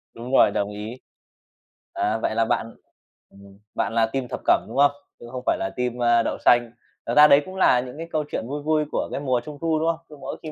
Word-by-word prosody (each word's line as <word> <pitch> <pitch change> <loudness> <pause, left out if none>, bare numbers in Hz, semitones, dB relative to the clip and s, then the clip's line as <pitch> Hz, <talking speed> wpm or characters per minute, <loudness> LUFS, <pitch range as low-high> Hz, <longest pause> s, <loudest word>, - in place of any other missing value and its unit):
Đúng 120 +3 -8
rồi, 105 - +6
đồng 100 0 -1
ý. 105 +4 -7 1.0
À, 105 +2 0
vậy 110 -1 -2
là 115 - +2
bạn 115 +1 -2 0.5
ừm, 100 0 -17 0.2
bạn - - -1
là 115 -1 +3
team 125 +2 -4
thập - - -5
cẩm, - - +3
đúng - - -7
không? 145 0 +5 0.3
Chứ - - -11
không 130 -1 -6
phải - - +2
là 95 - -3
team, 125 -1 -2
a, 120 0 +4
đậu - - -2
xanh. 120 -1 +4 0.3
Thực 120 - -2
ra 150 0 +9
đấy 140 0 +6
cũng 185 0 -9
là 130 -9 +4
những 125 +2 -7
cái 165 +1 -6
câu 155 -1 0
chuyện 110 - -3
vui 145 +2 -4
vui 155 0 +1
của - - -2
cái - - -3
mùa 130 -3 0
Trung 150 -1 -8
thu, 160 -2 +1
đúng 160 - 0
không? 165 0 -1
Cứ 150 - -12
mỗi - - -7
khi 155 - -6
125 Hz, 255 wpm, -23 LUFS, 115-150 Hz, 1.0 s, ra